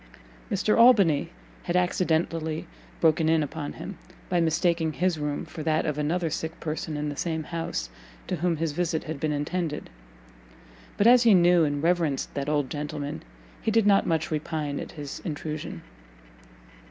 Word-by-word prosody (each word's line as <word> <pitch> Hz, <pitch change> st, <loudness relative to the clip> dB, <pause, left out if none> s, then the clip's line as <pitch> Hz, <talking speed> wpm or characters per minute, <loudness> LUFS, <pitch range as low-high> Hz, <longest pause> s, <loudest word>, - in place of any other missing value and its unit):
Mr. 205 Hz, +2 st, +2 dB
Albany 195 Hz, -, +5 dB, 0.4 s
had 175 Hz, -, -1 dB
accidentally 165 Hz, -3 st, 0 dB, 0.3 s
broken 160 Hz, -1 st, +3 dB
in 160 Hz, -1 st, +3 dB
upon 145 Hz, 0 st, -5 dB
him, 200 Hz, -, -8 dB, 0.3 s
by 175 Hz, -2 st, +2 dB
mistaking 165 Hz, 0 st, +1 dB
his 180 Hz, -2 st, 0 dB
room 150 Hz, -1 st, -2 dB
for 160 Hz, -, -8 dB
that 155 Hz, 0 st, +1 dB
of 150 Hz, -2 st, -1 dB
another 165 Hz, +3 st, 0 dB
sick 160 Hz, +1 st, -4 dB
person 155 Hz, -1 st, -3 dB
in 150 Hz, 0 st, -2 dB
the 145 Hz, -, -5 dB
same 160 Hz, 0 st, -2 dB
house, 170 Hz, +2 st, -3 dB, 0.4 s
to 180 Hz, -, -2 dB
whom 170 Hz, 0 st, 0 dB
his 160 Hz, 0 st, -1 dB
visit 165 Hz, 0 st, -1 dB
had 155 Hz, -2 st, -5 dB
been 155 Hz, +1 st, 0 dB
intended; 150 Hz, +2 st, -3 dB, 1.1 s
but 205 Hz, -, +2 dB
as 245 Hz, +1 st, +8 dB
he 230 Hz, -4 st, +6 dB
knew 175 Hz, -1 st, +5 dB
and 145 Hz, 0 st, -2 dB
reverenced 165 Hz, -5 st, +1 dB
that 140 Hz, 0 st, -3 dB
old 145 Hz, -3 st, +1 dB
gentleman, 150 Hz, +1 st, -4 dB, 0.4 s
he -, -, 0 dB
did 220 Hz, -1 st, +3 dB
not 200 Hz, -1 st, +4 dB
much 160 Hz, -1 st, 0 dB
repine 150 Hz, -2 st, -2 dB
at -, -, -7 dB
his 145 Hz, -4 st, -7 dB
intrusion. 155 Hz, -2 st, -5 dB
160 Hz, 165 wpm, -26 LUFS, 150-175 Hz, 1.1 s, as